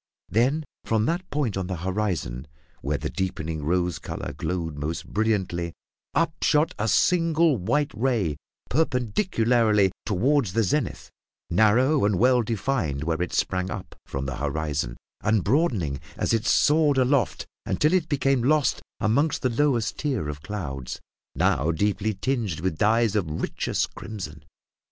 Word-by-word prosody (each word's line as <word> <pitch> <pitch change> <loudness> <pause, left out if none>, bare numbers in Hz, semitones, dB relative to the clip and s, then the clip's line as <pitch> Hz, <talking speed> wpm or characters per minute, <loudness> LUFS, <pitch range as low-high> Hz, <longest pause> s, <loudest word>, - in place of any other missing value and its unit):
Then 135 +8 +2 0.2
from 110 -1 +1
that 175 +6 -2
point 140 -8 -1
on 95 -2 -2
the 95 - -2
horizon 90 - -2 0.3
where 70 +1 -1
the - - -3
deepening 80 -4 -3
rose 90 +1 0
colour - - -5
glowed 85 -4 -3
most 75 +3 -4
brilliantly, 95 -6 -1 0.4
up 165 -1 +2
shot 155 +1 +3
a 105 - 0
single 165 - +3
white 145 +10 0
ray 110 - 0 0.3
perpendicularly 120 - +2 0.2
toward 130 +7 +2
the 110 +6 +1
zenith, 95 - -1 0.4
narrow 115 - +4
and 100 -2 +2
well 125 +4 +4
defined 110 - -1
where 80 +1 -1
it 90 - -1
sprang 95 0 0 0.4
from 70 0 -4
the 70 - -4
horizon, 75 -4 -2 0.2
and 110 -3 +2
broadening 105 - +1 0.2
as - - 0
it 115 -1 0
soared 150 -2 +4
aloft 130 -3 +2 0.2
until 150 +3 +2
it 175 -3 +1
became 135 -3 +2
lost 145 +1 +2 0.2
among 115 +8 +3 0.2
the 130 - +3
lowest 120 -3 +1
tier 130 - -1
of 75 0 -6
clouds, 70 -12 -5 0.4
now 70 +5 +2
deeply 100 +5 0
tinged 110 - -1
with 90 -3 -2
dyes 110 0 +3
of 95 -7 0
richest 75 - -2
crimson. 80 -9 -7
105 Hz, 140 wpm, -25 LUFS, 85-135 Hz, 0.4 s, narrow